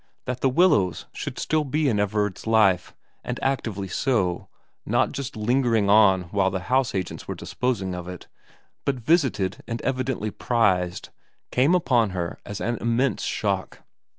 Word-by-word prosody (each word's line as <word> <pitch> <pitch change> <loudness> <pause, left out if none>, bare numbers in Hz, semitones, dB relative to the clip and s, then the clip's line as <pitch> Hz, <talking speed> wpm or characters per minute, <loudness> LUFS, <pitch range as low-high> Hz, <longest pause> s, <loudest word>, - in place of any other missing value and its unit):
That 125 0 -4
The 135 - +3
Willows 130 - +3
should - - -6
still 155 -1 0
be 150 +2 0
in 110 -6 +1
Everard's 105 0 -1
life, 105 -5 +3 0.3
and - - -4
actively 110 -7 -1
so, 95 -7 0 0.4
not - - +1
just 140 -1 -5
lingering 115 -2 +2
on 100 -3 +5
while 95 -1 +1
house 125 +6 0
agents 95 -2 -4
were - - -4
disposing 110 -8 -2
of 90 -1 -6
it, 90 -1 -8 0.6
but 140 - 0
visited 130 - +1
and 115 0 -3
evidently 130 -5 -1
prized, 95 -8 0 0.4
came 140 +8 +3
upon 125 - +2
her 85 -1 -3
as 105 -1 -5
an 120 0 -1
immense 120 +1 0
shock. - - -2
110 Hz, 150 wpm, -24 LUFS, 95-130 Hz, 0.6 s, on